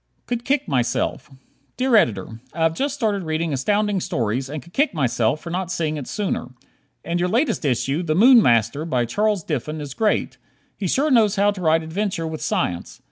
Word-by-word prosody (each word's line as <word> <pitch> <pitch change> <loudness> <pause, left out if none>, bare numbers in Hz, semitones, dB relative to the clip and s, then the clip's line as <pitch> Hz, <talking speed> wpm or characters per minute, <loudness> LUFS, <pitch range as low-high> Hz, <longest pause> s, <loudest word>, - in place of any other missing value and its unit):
"Could 240 -1 -3
Kick 285 0 0
Myself" 125 0 -1 0.5
Dear 255 -2 +2
Editor: 110 - +1
I 165 - 0
have 165 0 +3
just 275 - -2
started 215 -7 0
reading 160 -1 -2
Astounding 205 +8 +1
Stories 125 -3 -2
and 150 -2 -6
could 170 - -18
kick 285 - +1
myself 125 -1 0
for 170 - -7
not 185 0 -3
seeing 160 -4 -1
it 145 -4 -6
sooner. 190 - -3 0.5
In 170 +1 -1
your 180 - +1
latest 240 - +1
issue, 135 +3 0
"The 155 -3 -1
Moon 240 +5 +7
Master," 120 - +2
by 125 -7 0
Charles 205 - 0
Diffin, 155 0 -3
is 145 -3 -6
great. 215 +6 0 0.4
He 195 - -3
sure 285 - +1
knows 220 -5 +4
how 205 +1 +3
to 200 -2 -7
write 160 -1 +2
adventure 185 +1 -2
with 160 -1 -5
science. 85 -1 -2
165 Hz, 190 wpm, -22 LUFS, 140-210 Hz, 0.5 s, Moon